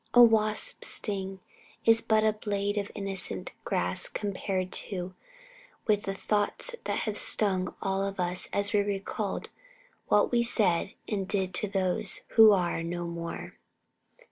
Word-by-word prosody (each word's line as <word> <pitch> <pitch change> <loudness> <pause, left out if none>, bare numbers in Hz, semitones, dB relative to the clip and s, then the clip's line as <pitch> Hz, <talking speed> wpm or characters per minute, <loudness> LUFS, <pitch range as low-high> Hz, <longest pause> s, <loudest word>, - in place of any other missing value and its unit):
A 245 - +10
wasp's 220 - +2
sting 195 -2 -2 0.4
is 225 0 +6
but 215 -1 +2
a 215 0 +3
blade 205 -1 -2
of 200 - -5
innocent 195 -2 -4
grass - - +2
compared 190 - -2 1.1
with 210 -2 +2
the 195 - -3
thoughts 210 - -1
that - - -1
have 215 -2 -2
stung 190 -4 +2
us - - -8
all 195 -2 -1 0.2
as 200 0 0
we 205 - +4
recalled 200 0 -3 0.6
what 205 - +3
we 240 -1 +3
said 200 -6 +1
and 195 -3 -2
did 190 -2 -1
to 210 - 0
those 190 -2 -1
who 220 -1 +8
are 175 -4 +1
now 175 +1 -4
no - - -4
more. 170 0 -6
200 Hz, 145 wpm, -28 LUFS, 190-215 Hz, 1.1 s, A